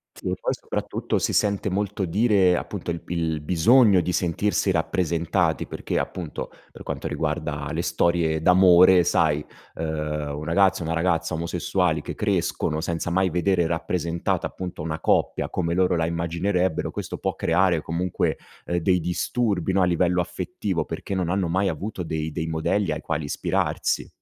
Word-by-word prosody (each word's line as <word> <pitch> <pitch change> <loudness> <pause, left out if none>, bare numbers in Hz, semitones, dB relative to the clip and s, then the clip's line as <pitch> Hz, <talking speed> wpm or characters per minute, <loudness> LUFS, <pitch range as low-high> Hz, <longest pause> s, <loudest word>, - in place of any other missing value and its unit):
Sì - - -5
e - - 0
poi - - -1
soprattutto - - -3
si - - 0
sente 100 0 +1
molto 100 0 -1
dire 95 0 +3
appunto 90 -1 -4
il 85 - -3
b - - -22
il 80 -3 -1
bisogno 95 - +5
di 90 +1 -1
sentirsi 90 +4 0
rappresentati 85 -1 0
perché - - -4
appunto, 85 -5 -4 0.2
per - - -12
quanto - - -4
riguarda 75 -2 -2
le - - -1
storie 85 -2 +1
d'amore 90 +1 +6
sai, 75 -2 +2 0.3
ehm, 75 -2 -3
un 75 - -6
ragazzo, 95 +2 +2
una 80 +1 -2
ragazza 85 0 0
omosessuali 85 0 0
che - - -5
crescono, 75 - -1
senza 85 +1 -2
mai 95 0 +1
vedere 90 0 +2
rappresentata 85 0 -1
appunto, 90 -4 -6
una 80 0 -3
coppia - - +1
come 85 -2 -1
loro 90 0 +2
la 80 -1 +1
immaginerebbero, 85 +2 -1
questo - - -5
può - - -2
creare 85 -1 +2
comunque, 85 +3 -1 0.3
ehm, 85 - -1
dei 90 +1 +2
disturbi 95 +2 -1
no, 95 - +3
a - - +5
livello 90 0 +2
affettivo 85 - -3
perché 100 - -5
non 90 -3 -1
hanno 95 -1 0
mai 95 +3 +1
avuto 95 +3 -4
dei 80 -1 -3
dei 80 - -3
modelli 80 +4 0
ai 80 +1 -3
quali 80 -1 -2
ispirarsi. 70 - -1
85 Hz, 165 wpm, -24 LUFS, 80-95 Hz, 0.3 s, d'amore